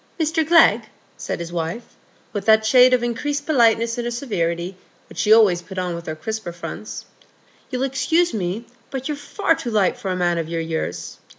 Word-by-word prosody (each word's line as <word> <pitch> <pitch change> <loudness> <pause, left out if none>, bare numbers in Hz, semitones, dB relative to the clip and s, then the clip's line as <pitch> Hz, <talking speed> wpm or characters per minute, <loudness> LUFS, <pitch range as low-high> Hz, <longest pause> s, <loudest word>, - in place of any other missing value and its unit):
"Mr 320 0 +1
Glegg," 315 -8 +5 0.3
said - - -5
his 170 0 -6
wife, 170 +7 -4 0.4
with 205 -2 -4
that 220 0 +5
shade 250 +3 +6
of 250 -1 +3
increased 285 +5 -2
politeness 235 -4 +3
in 240 - -3
her - - -1
severity 185 -8 -2 0.3
which - - -10
she 215 - +2
always 210 -6 +6
put 185 +2 -11
on 180 -1 -2
with 170 0 -7
her 155 - -3
crisper 220 +3 -5
fronts, 170 +5 -7 0.6
"you'll 255 -1 -2
excuse 320 +6 +1
me, 200 +2 -3 0.2
but 265 -1 -4
you're 300 - -2
far 325 +5 0
too 320 -7 -5
light 210 -5 +2
for 195 - -5
a 185 - -1
man 175 -1 +1
of 165 -1 -4
your 165 0 -2
years. 160 - -4
220 Hz, 195 wpm, -21 LUFS, 175-260 Hz, 0.6 s, shade